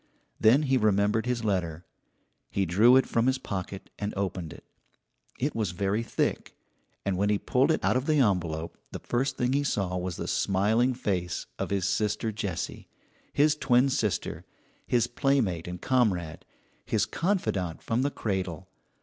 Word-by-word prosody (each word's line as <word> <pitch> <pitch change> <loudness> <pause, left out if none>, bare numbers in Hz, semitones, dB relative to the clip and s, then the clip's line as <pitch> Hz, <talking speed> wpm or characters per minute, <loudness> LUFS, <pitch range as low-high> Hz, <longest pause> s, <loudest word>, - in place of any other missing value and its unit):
Then 120 +7 +5
he 135 -2 +2
remembered 105 +1 +2
his 120 -2 -1
letter. 90 -5 -1 0.6
He 100 - 0
drew 105 +9 +5
it 130 - +3
from 115 +2 +1
his 130 0 +2
pocket 95 -3 -6
and 105 0 -3
opened 90 -4 -3
it. - - -12 0.7
It 140 +4 -1
was 105 -6 -2
very 100 +4 0
thick; 115 - -2 0.5
and 100 -2 0
when 100 +2 +1
he 105 - +3
pulled 130 +7 +1
it 160 - +1
out - - +3
of 130 +2 0
the 155 - +3
envelope 85 - 0
the - - -4
first 130 +3 -1
thing 125 +1 +1
he 140 +1 +2
saw 95 -9 -1
was 90 -1 -3
the - - -5
smiling 110 +6 +2
face 90 -7 -2
of - - -2
his 95 -2 0
sister 110 +2 0
Jessie, 100 -5 -4 0.4
his 150 +1 +3
twin 130 -2 +3
sister, 110 -6 -1 0.4
his 120 -2 +3
playmate 120 - 0
and 90 0 -5
comrade, 95 -11 0 0.4
his - - +1
confidante 135 - -1
from 115 +2 0
the 140 - +1
cradle. 95 - -3
105 Hz, 165 wpm, -28 LUFS, 95-125 Hz, 0.7 s, Then